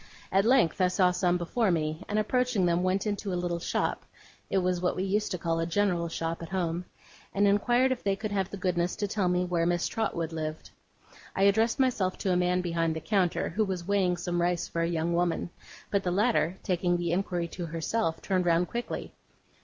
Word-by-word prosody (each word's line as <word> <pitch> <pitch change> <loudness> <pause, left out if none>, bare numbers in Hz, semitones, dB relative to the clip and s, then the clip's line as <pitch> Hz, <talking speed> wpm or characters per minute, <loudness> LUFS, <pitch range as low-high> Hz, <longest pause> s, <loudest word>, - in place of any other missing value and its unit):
At 195 +2 +3
length 230 -8 +3
I 185 - +5
saw 180 0 +3
some 180 -1 +1
before 195 +6 0
me; 155 -2 -1
and 210 - 0
approaching 245 -2 +1
them, 170 0 +2
went 185 +2 0
into 205 -1 -2
a - - -1
little 175 -1 -2
shop - - -1 0.5
(it - - +1
was 180 -1 +1
what 180 - +1
we 185 - -1
used 205 +2 0
to 180 - -2
call 165 -1 -1
a 165 - -1
general 175 -2 +1
shop, 165 0 -3
at 165 - -7
home), 175 -2 -2 0.5
and 200 +1 +4
inquired 240 +6 +3
if 255 - -2
they 195 -1 +1
could 215 +1 -5
have 195 -2 0
the 200 - -6
goodness 180 -1 0
to 205 - -2
tell 195 -2 0
me 180 0 +1
where 170 -2 0
Miss 175 0 +1
Trotwood 170 -7 -2
lived. 155 -1 -5 0.6
I 195 - +2
addressed 220 +5 +3
myself 230 -8 +1
to 190 - 0
a - - +2
man 180 0 +2
behind 165 -2 0
the - - -2
counter, 180 +2 0
who 210 +6 0
was 185 -4 -3
weighing 190 -3 +2
some 175 0 -1
rice 175 0 0
for 170 - -2
a 165 - +1
young 170 0 0
woman; 175 0 0 0.4
but 200 - +2
the 185 - -1
latter, 190 -3 +1
taking 175 -1 +1
the 175 -1 -1
inquiry 175 -1 -1
to 175 +1 -5
herself, 165 +2 -2
turned 185 -2 0
round 170 +1 +3
quickly. 240 0 -4
180 Hz, 215 wpm, -28 LUFS, 170-200 Hz, 0.6 s, I